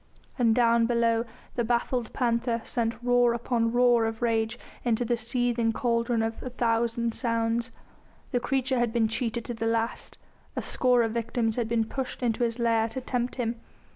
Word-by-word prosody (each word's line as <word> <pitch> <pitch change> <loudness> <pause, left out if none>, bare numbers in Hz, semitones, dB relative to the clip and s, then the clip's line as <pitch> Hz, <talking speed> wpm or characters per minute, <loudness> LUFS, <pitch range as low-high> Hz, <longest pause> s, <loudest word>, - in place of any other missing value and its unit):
And 230 -2 +4
down 235 -1 +4
below 230 -1 +2 0.3
the 240 - 0
baffled 240 0 0
panther 235 -1 0
sent 230 -1 -1
roar 245 -1 +4
upon 230 -1 0
roar 240 -1 +4
of 225 +1 -3
rage 225 0 +1 0.3
into 240 0 +1
the 240 +1 +1
seething 235 0 0
cauldron 235 -1 +1
of 225 0 -3
a 255 - -5
thousand 235 -1 0
sounds. 230 0 -1 0.6
The 245 - +1
creature 260 0 0
had 240 -2 +1
been 225 -1 +2
cheated 225 +1 -2
to 240 - -4
the 225 0 -2
last; 230 +1 -2 0.4
a - - -1
score 250 -2 +2
of 225 - -1
victims 230 -1 -1
had 235 -3 -1
been 225 -1 +1
pushed 260 +2 -5
into 240 0 +1
his 230 0 0
lair 230 -2 +2
to 225 - -4
tempt 245 -1 -2
him. 235 -2 -2
235 Hz, 175 wpm, -27 LUFS, 230-245 Hz, 0.6 s, And